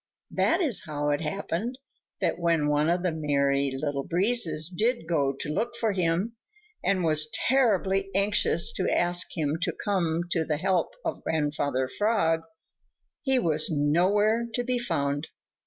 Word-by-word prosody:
That 335 Hz, +3 st, +2 dB
is 280 Hz, -, +1 dB
how 145 Hz, -1 st, -2 dB
it 145 Hz, -, 0 dB
happened 195 Hz, +8 st, -3 dB, 0.4 s
that -, -, 0 dB
when 165 Hz, -3 st, +1 dB
one 150 Hz, +2 st, +2 dB
of 175 Hz, +1 st, 0 dB
the 180 Hz, -, +1 dB
Merry 140 Hz, -3 st, +1 dB
Little 140 Hz, +1 st, -2 dB
Breezes 175 Hz, -, +1 dB
did 215 Hz, +4 st, -1 dB
go 145 Hz, -5 st, +1 dB
to 140 Hz, +3 st, -5 dB
look 235 Hz, +7 st, -2 dB
for 225 Hz, -2 st, +1 dB
him, 185 Hz, +4 st, -1 dB, 0.5 s
and 190 Hz, -2 st, +1 dB
was 155 Hz, -1 st, +3 dB, 0.2 s
terribly 195 Hz, -7 st, +2 dB
anxious 200 Hz, -4 st, +2 dB
to -, -, 0 dB
ask 175 Hz, 0 st, +2 dB
him 155 Hz, 0 st, -1 dB
to -, -, 0 dB
come 170 Hz, -5 st, 0 dB
to 165 Hz, -, +1 dB
the 155 Hz, -1 st, -1 dB
help 190 Hz, -, 0 dB
of -, -, -3 dB
Grandfather 145 Hz, -4 st, -1 dB
Frog, 165 Hz, -, +1 dB, 0.8 s
he 265 Hz, -2 st, +2 dB
was 160 Hz, -9 st, +2 dB
nowhere 190 Hz, +10 st, +2 dB
to 245 Hz, -, 0 dB
be 250 Hz, 0 st, -1 dB
found. 145 Hz, -10 st, -1 dB
170 Hz, 155 wpm, -27 LUFS, 150-205 Hz, 0.8 s, was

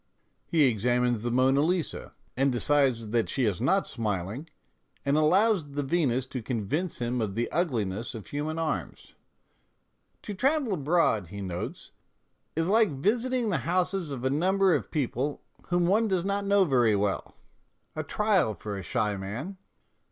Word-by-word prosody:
He 160 Hz, -3 st, +3 dB
examines 120 Hz, -1 st, +2 dB
the 120 Hz, -, -1 dB
Monna 130 Hz, +3 st, +3 dB
Lisa, 170 Hz, +1 st, -1 dB, 0.2 s
and 135 Hz, +1 st, +2 dB
decides 125 Hz, -3 st, +1 dB
that 115 Hz, 0 st, 0 dB
she 130 Hz, -, 0 dB
is 105 Hz, -1 st, -1 dB
not 190 Hz, +10 st, +2 dB
smiling, 110 Hz, -, -3 dB, 0.6 s
and 140 Hz, +1 st, +2 dB
allows 175 Hz, 0 st, +3 dB
the 145 Hz, 0 st, -1 dB
Venus 135 Hz, -4 st, +1 dB
to 130 Hz, -1 st, -5 dB
convince 130 Hz, -, -2 dB
him 120 Hz, 0 st, -1 dB
of 100 Hz, -3 st, -2 dB
the 120 Hz, +1 st, -1 dB
ugliness 115 Hz, -, -1 dB
of 110 Hz, -, -8 dB
human 150 Hz, +2 st, -3 dB
arms. 165 Hz, -1 st, -4 dB, 0.5 s
" -, -, -46 dB
To 210 Hz, -, -5 dB
travel 265 Hz, +1 st, +1 dB
abroad," 150 Hz, -, +1 dB
he 100 Hz, +4 st, -8 dB
notes, 90 Hz, -3 st, -5 dB, 0.3 s
" -, -, -47 dB
is 165 Hz, +1 st, +1 dB
like 215 Hz, +1 st, +4 dB
visiting 230 Hz, -, 0 dB
the 180 Hz, -, +1 dB
houses 180 Hz, 0 st, 0 dB
of 130 Hz, -3 st, -5 dB
a 130 Hz, -, +2 dB
number 190 Hz, +5 st, +3 dB
of -, -, -1 dB
people 140 Hz, 0 st, -2 dB, 0.2 s
whom 175 Hz, -1 st, +2 dB
one 215 Hz, +5 st, +3 dB
does 185 Hz, -3 st, 0 dB
not 200 Hz, 0 st, -1 dB
know 200 Hz, -1 st, +4 dB
very 120 Hz, -8 st, +3 dB
well 100 Hz, -1 st, -2 dB, 0.6 s
a -, -, -2 dB
trial 200 Hz, -, +1 dB
for 100 Hz, -1 st, -5 dB
a -, -, -5 dB
shy 105 Hz, +3 st, -1 dB
man." 115 Hz, -, -6 dB
140 Hz, 165 wpm, -28 LUFS, 115-180 Hz, 0.6 s, like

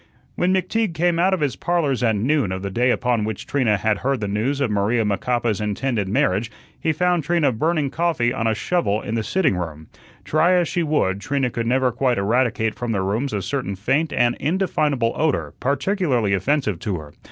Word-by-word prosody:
When 180 Hz, +1 st, +1 dB
McTeague 190 Hz, 0 st, 0 dB
came 170 Hz, 0 st, +1 dB
out 185 Hz, +2 st, +3 dB
of 190 Hz, -4 st, 0 dB
his 145 Hz, -3 st, 0 dB
"Parlors" 165 Hz, -8 st, 0 dB
at 115 Hz, -3 st, +2 dB
noon 125 Hz, 0 st, +1 dB
of 95 Hz, +1 st, -4 dB
the 100 Hz, -, -3 dB
day 120 Hz, +5 st, +2 dB
upon 120 Hz, -3 st, +1 dB
which 110 Hz, -1 st, -4 dB
Trina 120 Hz, -7 st, +1 dB
had 105 Hz, +1 st, 0 dB
heard 135 Hz, 0 st, 0 dB
the 105 Hz, -, -2 dB
news 110 Hz, +8 st, -1 dB
of 135 Hz, -6 st, 0 dB
Maria 105 Hz, +3 st, +1 dB
Macapa's 110 Hz, +1 st, 0 dB
intended 105 Hz, 0 st, -1 dB
marriage, 100 Hz, +2 st, +1 dB, 0.3 s
he 160 Hz, -, +1 dB
found 175 Hz, +1 st, +1 dB
Trina 160 Hz, -3 st, +2 dB
burning 150 Hz, +3 st, 0 dB
coffee 160 Hz, -8 st, 0 dB
on 115 Hz, -, -1 dB
a 110 Hz, -, +1 dB
shovel 110 Hz, -, 0 dB
in 110 Hz, -, -4 dB
the 115 Hz, -, 0 dB
sitting 110 Hz, -, +1 dB
room. 80 Hz, -3 st, -6 dB, 0.4 s
Try 165 Hz, +4 st, +3 dB
as 175 Hz, -2 st, +3 dB
she 175 Hz, -, -1 dB
would, 145 Hz, -, 0 dB
Trina 130 Hz, +4 st, -1 dB
could 115 Hz, 0 st, -3 dB
never 130 Hz, +1 st, +2 dB
quite 125 Hz, +1 st, 0 dB
eradicate 110 Hz, +1 st, +1 dB
from 120 Hz, -2 st, -3 dB
their 95 Hz, -2 st, 0 dB
rooms 110 Hz, +8 st, -1 dB
a 100 Hz, -2 st, -2 dB
certain 115 Hz, -2 st, -3 dB
faint 140 Hz, +11 st, 0 dB
and 120 Hz, -1 st, +2 dB
indefinable 150 Hz, -8 st, 0 dB
odor, 155 Hz, -1 st, 0 dB
particularly 135 Hz, -, 0 dB
offensive 105 Hz, -, 0 dB
to 95 Hz, -1 st, -2 dB
her. 75 Hz, -2 st, -10 dB
125 Hz, 200 wpm, -22 LUFS, 105-155 Hz, 0.4 s, out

